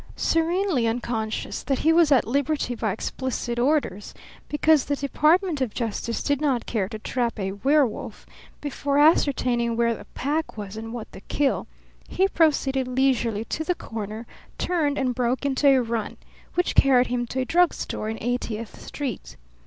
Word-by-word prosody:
Serenely 330 Hz, -5 st, +1 dB
unconscious 225 Hz, -2 st, -2 dB
that 270 Hz, -, -1 dB
he 320 Hz, +4 st, +3 dB
was 330 Hz, -3 st, +4 dB
at 265 Hz, -4 st, +5 dB
liberty 280 Hz, +1 st, 0 dB
by 220 Hz, -3 st, -1 dB
explicit 240 Hz, +3 st, -3 dB
orders, 250 Hz, -7 st, 0 dB, 0.3 s
because 300 Hz, -1 st, +3 dB
the 285 Hz, -, 0 dB
Department 305 Hz, +3 st, +2 dB
of 250 Hz, -5 st, -2 dB
Justice 230 Hz, 0 st, -2 dB
did 285 Hz, -1 st, 0 dB
not 270 Hz, -5 st, +1 dB
care 200 Hz, -5 st, -1 dB
to 220 Hz, -, -5 dB
trap 235 Hz, +2 st, -2 dB
a 190 Hz, -1 st, -2 dB
werewolf 265 Hz, +3 st, 0 dB, 0.4 s
before 285 Hz, -1 st, -1 dB
ascertaining 250 Hz, -6 st, +3 dB
where 235 Hz, 0 st, +2 dB
the -, -, -9 dB
pack 300 Hz, 0 st, -2 dB
was 205 Hz, -1 st, -6 dB
and 225 Hz, +1 st, -6 dB
what 235 Hz, -2 st, -7 dB
the -, -, -11 dB
kill, 285 Hz, +5 st, 0 dB, 0.4 s
he 385 Hz, -, +2 dB
proceeded 280 Hz, -7 st, +2 dB
leisurely 250 Hz, -4 st, +1 dB
to 315 Hz, -, -3 dB
the 360 Hz, +2 st, 0 dB
corner, 220 Hz, -2 st, -6 dB, 0.3 s
turned, 305 Hz, -5 st, 0 dB
and 260 Hz, -2 st, 0 dB
broke 250 Hz, +2 st, -1 dB
into 280 Hz, +1 st, +2 dB
a 270 Hz, -1 st, +6 dB
run, 230 Hz, -2 st, -3 dB, 0.4 s
which 355 Hz, -, +1 dB
carried 255 Hz, -2 st, +5 dB
him 240 Hz, -1 st, -2 dB
to 260 Hz, +2 st, -2 dB
a -, -, -1 dB
drug 350 Hz, +4 st, +4 dB
store 215 Hz, -, -4 dB
in 225 Hz, -, -4 dB
Eightieth 235 Hz, -2 st, -3 dB
Street. 270 Hz, -9 st, -6 dB
255 Hz, 165 wpm, -24 LUFS, 230-290 Hz, 0.4 s, a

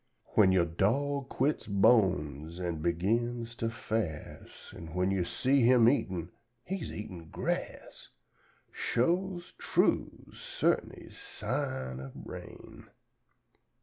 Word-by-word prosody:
"When 95 Hz, -3 st, +6 dB
yo' 90 Hz, -2 st, +4 dB
dog 130 Hz, -, 0 dB
quits 145 Hz, +4 st, 0 dB
bones 90 Hz, -, +2 dB
an' 85 Hz, -2 st, -2 dB
begins 115 Hz, +8 st, 0 dB
to 115 Hz, -, -1 dB
fas', 110 Hz, -7 st, -5 dB
An' 80 Hz, 0 st, -9 dB
when 90 Hz, +1 st, +2 dB
you 95 Hz, -2 st, +1 dB
see 130 Hz, +9 st, +2 dB
him 120 Hz, -1 st, +6 dB
eatin'; 90 Hz, -, +1 dB, 0.3 s
he's 190 Hz, +1 st, -4 dB
eatin' 90 Hz, -6 st, -7 dB
grass: -, -, -4 dB, 0.6 s
Shoes', 175 Hz, +7 st, 0 dB
trues', -, -, 0 dB
cert'nes -, -, -1 dB
sign 65 Hz, -1 st, -3 dB
ob 65 Hz, -1 st, -8 dB
rain!" -, -, -10 dB
100 Hz, 105 wpm, -31 LUFS, 85-120 Hz, 0.6 s, When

